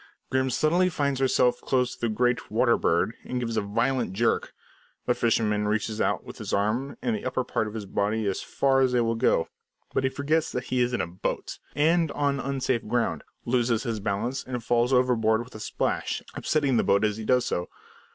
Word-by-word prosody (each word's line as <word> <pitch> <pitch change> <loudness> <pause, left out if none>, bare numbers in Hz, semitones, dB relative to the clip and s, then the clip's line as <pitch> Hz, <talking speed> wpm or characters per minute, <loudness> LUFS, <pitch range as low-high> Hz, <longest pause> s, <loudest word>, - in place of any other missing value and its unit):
Grim 130 0 +2
suddenly 170 +8 +2
finds 140 -6 -1
herself 125 -2 +2
close 125 -2 +1
to - - -15
the 120 - +1
great 125 +3 0
"water 120 +2 +3
bird," 85 +7 +1
and 125 - -3
gives 115 -2 -2
a - - +2
violent 115 +1 0
jerk. 115 +3 +1 0.5
The - - +3
fisherman 105 -3 +1
reaches 110 +1 -1
out - - 0
with - - -10
his - - -5
arm, 110 +8 0
and 235 - +1
the 210 - -5
upper 130 0 -1
part 110 -3 -1
of 105 - -7
his 105 -2 -4
body 105 +3 -1
as 100 -1 -1
far 135 -1 +2
as 130 -1 +2
they 125 - +3
will 115 0 +1
go; 115 -7 +2 0.5
but - - +1
he 130 - +2
forgets 150 +4 0
that 125 - -2
he 125 0 -1
is 120 0 +2
in 120 - 0
a - - -1
boat 90 +2 -4 0.2
and 165 +1 +3
on 140 -1 0
unsafe 130 -4 -1
ground, 115 -9 0 0.2
loses 120 -2 +1
his 115 -4 -2
balance, 110 +6 -2
and 125 -2 -5
falls 120 +1 +2
overboard 120 -3 +3
with 125 - -16
a 110 - -8
splash, - - -2
upsetting 140 -5 +1
the - - +3
boat 100 +2 +3
as 105 0 -1
he 110 - -5
does 125 +2 +2
so. 90 - -2
120 Hz, 210 wpm, -26 LUFS, 110-130 Hz, 0.5 s, water